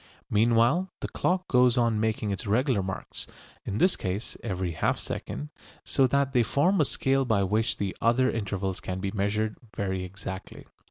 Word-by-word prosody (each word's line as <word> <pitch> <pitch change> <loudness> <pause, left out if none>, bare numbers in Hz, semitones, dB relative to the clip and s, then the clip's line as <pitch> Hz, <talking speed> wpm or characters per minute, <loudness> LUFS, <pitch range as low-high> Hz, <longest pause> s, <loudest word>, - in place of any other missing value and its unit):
Meanwhile 120 - +3
the - - -2
clock 185 +1 0
goes 125 -1 +4
on 115 -3 +2
making 110 -1 0
its 100 +2 -4
regular 120 +1 +2
marks 95 0 -6 0.4
(in 100 - -2
this 185 +7 +4
case 95 +5 -4
every 95 -5 -2
half 80 - 0
second), 75 +3 -5 0.3
so 135 - +3
that 140 +1 +1
they 125 - +5
form 155 - +2
a - - +4
scale 135 +1 +1
by 110 -6 +2
which 105 +4 +1
the 100 -2 -2
other 120 +3 +3
intervals 100 -5 -2
can 95 0 -4
be 95 0 -2
measured 105 +1 -1 0.2
very 95 -3 -2
exactly. 95 0 -8
110 Hz, 170 wpm, -27 LUFS, 95-125 Hz, 0.4 s, they